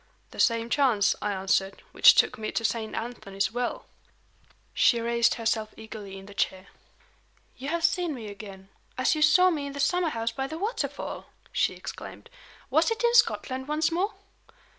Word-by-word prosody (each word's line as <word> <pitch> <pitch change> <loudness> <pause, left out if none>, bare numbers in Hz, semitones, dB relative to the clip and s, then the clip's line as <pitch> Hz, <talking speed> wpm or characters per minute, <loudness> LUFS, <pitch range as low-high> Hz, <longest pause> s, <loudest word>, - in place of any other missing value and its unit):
"The - - -11
same 230 0 +2
chance," 245 -8 +3
I 210 - -1
answered, 195 0 -1
"which - - +7
took - - +3
me 215 - -3
to 230 - -1
Saint 220 -1 -2
Anthony's 205 -4 -3
Well." 245 +1 -3 0.9
She 235 - +4
raised 235 0 +2
herself 220 -2 -2
eagerly 215 -3 -9
in 195 - -11
the 205 - -12
chair. 190 -1 -2 0.9
"You 270 +2 -6
have 340 +1 -1
seen 335 -2 +1
me 225 -4 -8
again 195 -2 -10 0.3
as 255 - +2
you 310 - -2
saw 365 +4 +6
me 290 -4 -3
in 280 - -7
the 280 - -7
summer 350 +4 +2
house 230 -4 -2
by 270 +4 -3
the 315 - -6
waterfall!" 415 +7 -4 0.2
she - - +1
exclaimed. 475 - -9 0.4
"Was 315 - +3
it 455 +1 -2
in 475 0 +3
Scotland 265 - +2
once 305 +2 +1
more?" 365 +5 -1
240 Hz, 175 wpm, -27 LUFS, 215-315 Hz, 0.9 s, which